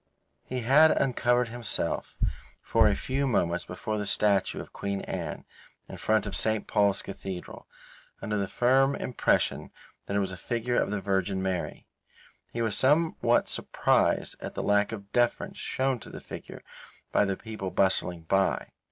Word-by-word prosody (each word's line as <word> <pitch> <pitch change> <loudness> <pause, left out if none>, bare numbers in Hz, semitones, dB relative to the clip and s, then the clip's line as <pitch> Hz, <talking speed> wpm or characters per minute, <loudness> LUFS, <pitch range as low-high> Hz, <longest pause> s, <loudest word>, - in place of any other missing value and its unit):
He 125 -1 -4
had 145 +7 +6
uncovered 125 -3 +2
himself 120 0 -2 0.5
for 115 -1 +4
a 100 - +3
few 135 +1 -1
moments 90 -8 0
before 105 +4 -4
the 105 - -3
statue 105 -1 +2
of - - -9
Queen 100 -1 -3
Anne, - - -5 0.4
in - - -8
front 110 0 +1
of 100 - -4
St. 110 -1 0
Paul's 100 -2 +2
Cathedral, 95 -2 -7 0.5
under 105 +1 -3
the 100 -1 0
firm 130 +7 +3
impression 125 - 0 0.4
that 100 - -2
it - - +3
was 95 -1 -1
a 95 - -7
figure 120 +6 -1
of - - -1
the 105 -1 -2
Virgin 95 0 0
Mary. 95 -2 -3 0.7
He 115 - -2
was 110 -3 0
somewhat 155 +5 +3
surprised - - +1
at - - -6
the - - -2
lack 105 +1 +2
of 100 -3 -8
deference 120 -1 0
shown 130 -1 -1
to - - -11
the - - -8
figure - - -9 0.5
by - - +4
the 100 -2 -1
people 110 -4 -6
bustling 90 -3 +2
by. 95 +3 +1
105 Hz, 160 wpm, -28 LUFS, 100-120 Hz, 0.7 s, had